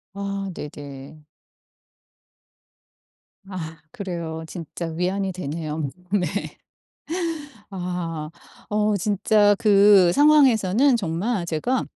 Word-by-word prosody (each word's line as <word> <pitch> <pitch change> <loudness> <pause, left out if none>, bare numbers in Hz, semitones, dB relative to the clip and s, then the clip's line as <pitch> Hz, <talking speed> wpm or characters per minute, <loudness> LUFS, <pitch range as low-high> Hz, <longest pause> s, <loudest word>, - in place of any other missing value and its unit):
아 200 -1 -3
네네. 145 0 -9 2.3
아 165 -4 -6
그래요. 170 -4 -5
진짜 170 +1 -6
위안이 185 +4 -1
되네요. 155 -3 -4 0.2
네. 200 -3 +2 1.4
아. 175 -5 -4 0.4
어 210 0 +1
진짜 205 +1 +3
그 200 -4 +6
상황에서는 265 -5 +5
정말 190 +1 -1
제가 225 +11 0
185 Hz, 150 characters per minute, -23 LUFS, 160-205 Hz, 2.3 s, 그